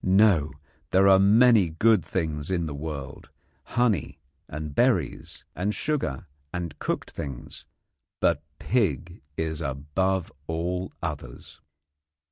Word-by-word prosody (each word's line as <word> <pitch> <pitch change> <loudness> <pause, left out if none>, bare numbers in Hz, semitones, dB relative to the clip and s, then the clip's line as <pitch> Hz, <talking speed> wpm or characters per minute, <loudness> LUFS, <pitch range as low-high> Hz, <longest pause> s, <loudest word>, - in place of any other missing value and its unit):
No; 95 -7 +4 0.4
there 95 +1 +5
are 95 -1 +7
many 105 -1 +6
good 105 +4 +3
things 80 -2 -2
in 85 -3 0
the 75 - -4
world 70 -2 -6 0.5
honey 115 -10 +1 0.3
and 75 0 -6
berries - - 0
and 100 +4 -1
sugar 90 - -2 0.3
and 85 -3 -5
cooked - - -3
things; 70 -4 -7 0.5
but 70 - +2 0.2
pig 90 - -1 0.2
is 80 0 -2
above 80 +7 -1 0.2
all 90 +3 -2
others. 75 -6 -7
85 Hz, 110 wpm, -26 LUFS, 75-95 Hz, 0.5 s, are